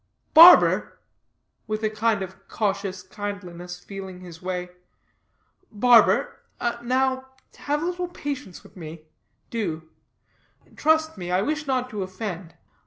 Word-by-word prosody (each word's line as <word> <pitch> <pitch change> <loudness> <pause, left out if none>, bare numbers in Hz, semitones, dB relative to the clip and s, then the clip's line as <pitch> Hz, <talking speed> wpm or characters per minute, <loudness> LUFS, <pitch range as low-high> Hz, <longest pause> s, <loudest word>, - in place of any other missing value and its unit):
"Barber," 335 +3 +8 0.7
with 215 0 -3
a 215 - +2
kind 215 -2 0
of 190 +1 -11
cautious 200 -3 -2
kindliness, 180 -4 -7
feeling 190 -2 -9
his 170 -3 -11
way, 180 -1 -4 1.0
"barber, 235 +2 +4 0.4
now 260 +2 0 0.3
have 295 +2 -2
a - - -1
little 360 0 -2
patience 285 - -6
with - - -18
me; 160 -3 -9 0.5
do; 160 -9 -4 0.8
trust 315 -5 +1
me, 175 -1 -5
I 185 +2 +2
wish 305 +3 -2
not 255 -2 0
to 210 -3 -4
offend. 185 -2 -6
205 Hz, 120 wpm, -24 LUFS, 185-260 Hz, 1.0 s, Barber